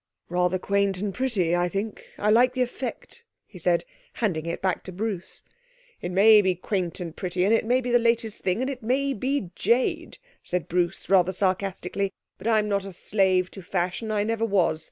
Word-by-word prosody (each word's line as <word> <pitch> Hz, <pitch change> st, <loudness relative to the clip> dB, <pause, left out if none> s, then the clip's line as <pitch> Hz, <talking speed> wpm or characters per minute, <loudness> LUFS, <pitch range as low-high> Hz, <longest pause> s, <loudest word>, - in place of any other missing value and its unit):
'Rather 180 Hz, +1 st, +1 dB
quaint 200 Hz, 0 st, +1 dB
and 200 Hz, +1 st, -2 dB
pretty, 200 Hz, -10 st, +1 dB
I 175 Hz, 0 st, +1 dB
think. 200 Hz, +3 st, -4 dB
I 210 Hz, +1 st, +2 dB
like 250 Hz, +3 st, +5 dB
the 255 Hz, -1 st, +2 dB
effect,' 255 Hz, -, -6 dB, 0.2 s
he -, -, -13 dB
said, -, -, +1 dB, 0.3 s
handing 170 Hz, -8 st, -1 dB
it 170 Hz, -, -3 dB
back 185 Hz, -1 st, -1 dB
to 185 Hz, -, -6 dB
Bruce. 195 Hz, -1 st, -5 dB, 0.6 s
'It 175 Hz, -, -4 dB
may 210 Hz, +3 st, +7 dB
be 190 Hz, -2 st, +1 dB
quaint 180 Hz, -1 st, -2 dB
and 170 Hz, -2 st, -6 dB
pretty, 180 Hz, 0 st, -1 dB
and 210 Hz, -, +3 dB
it 225 Hz, -, +2 dB
may 250 Hz, +3 st, +2 dB
be 250 Hz, -1 st, -3 dB
the 240 Hz, -, +5 dB
latest 230 Hz, -2 st, 0 dB
thing, 185 Hz, +5 st, 0 dB
and 260 Hz, -, -1 dB
it 260 Hz, -2 st, -7 dB
may 270 Hz, +5 st, 0 dB
be 260 Hz, -5 st, -2 dB
jade,' 235 Hz, +8 st, 0 dB, 0.2 s
said 180 Hz, -1 st, -3 dB
Bruce 175 Hz, -1 st, -1 dB
rather 185 Hz, -1 st, +4 dB
sarcastically, 195 Hz, +1 st, -1 dB, 0.3 s
'but 195 Hz, -, -5 dB
I'm 215 Hz, -2 st, +3 dB
not 200 Hz, -1 st, 0 dB
a 195 Hz, -, -7 dB
slave 185 Hz, -1 st, +1 dB
to 195 Hz, -, -9 dB
fashion. 185 Hz, +4 st, -2 dB
I 210 Hz, -1 st, +1 dB
never 225 Hz, +1 st, -1 dB
was. 190 Hz, -7 st, +2 dB
200 Hz, 195 wpm, -25 LUFS, 180-225 Hz, 0.6 s, may